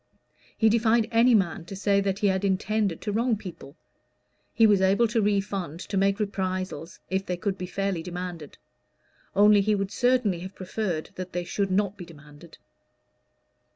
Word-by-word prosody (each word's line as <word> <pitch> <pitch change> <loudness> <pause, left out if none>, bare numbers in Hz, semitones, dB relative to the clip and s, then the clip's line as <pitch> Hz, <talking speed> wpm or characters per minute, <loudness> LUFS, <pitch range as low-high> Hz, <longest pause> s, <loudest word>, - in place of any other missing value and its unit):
He 225 - +4
defied 225 0 +3
any 235 +1 +5
man 175 -5 0
to 195 - -8
say 200 0 +2
that 195 -1 -1
he 205 - -2
had 190 +1 0
intended 200 -1 0
to 210 - -3
wrong 230 +2 +1
people; 175 -8 -10 0.8
he 225 - +4
was 205 -3 +4
able 195 +5 +3
to 225 +1 0
refund, 195 -5 -1
to 200 - -6
make 195 +1 +2
reprisals, 185 -4 -3
if 190 0 0
they 180 -2 -3
could 195 +1 -2
be 180 -1 -6
fairly 195 -2 -2
demanded. 175 -3 -7 0.8
Only 205 +1 +6
he 210 +1 +2
would 195 -1 -2
certainly 245 -5 +1
have 185 +2 -8
preferred 185 -3 -4
that 185 0 -6
they 175 0 -2
should 195 +3 -2
not 200 +1 0
be 180 - -8
demanded. 150 0 -15
195 Hz, 170 wpm, -26 LUFS, 180-210 Hz, 0.8 s, Only